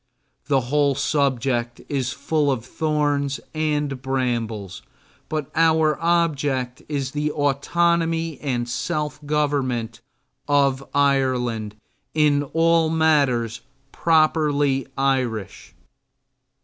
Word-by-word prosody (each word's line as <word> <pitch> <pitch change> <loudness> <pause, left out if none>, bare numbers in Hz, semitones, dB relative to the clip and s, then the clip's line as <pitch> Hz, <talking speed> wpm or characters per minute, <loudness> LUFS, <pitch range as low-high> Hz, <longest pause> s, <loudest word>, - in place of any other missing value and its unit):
The 140 -3 +3
whole 140 +2 +1
subject 130 -4 0
is 135 -3 -1
full 145 +1 0
of 120 -4 -3
thorns 145 -2 -1
and 150 -4 -1
brambles, 115 -7 -2 0.5
but 155 -3 -3
our 160 -1 +3
object 145 -7 0
is 140 -3 -2
the 150 +1 -1
autonomy 165 +3 0
and 125 -4 -2
self 150 +4 -3
government 135 -7 -1 0.5
of 140 -2 +2
Ireland 125 -6 +1 0.4
in 150 -2 +3
all 165 +2 +2
matters 140 -8 +2 0.3
properly 150 -4 +2
Irish. 130 -7 -2
140 Hz, 90 wpm, -22 LUFS, 130-155 Hz, 0.5 s, The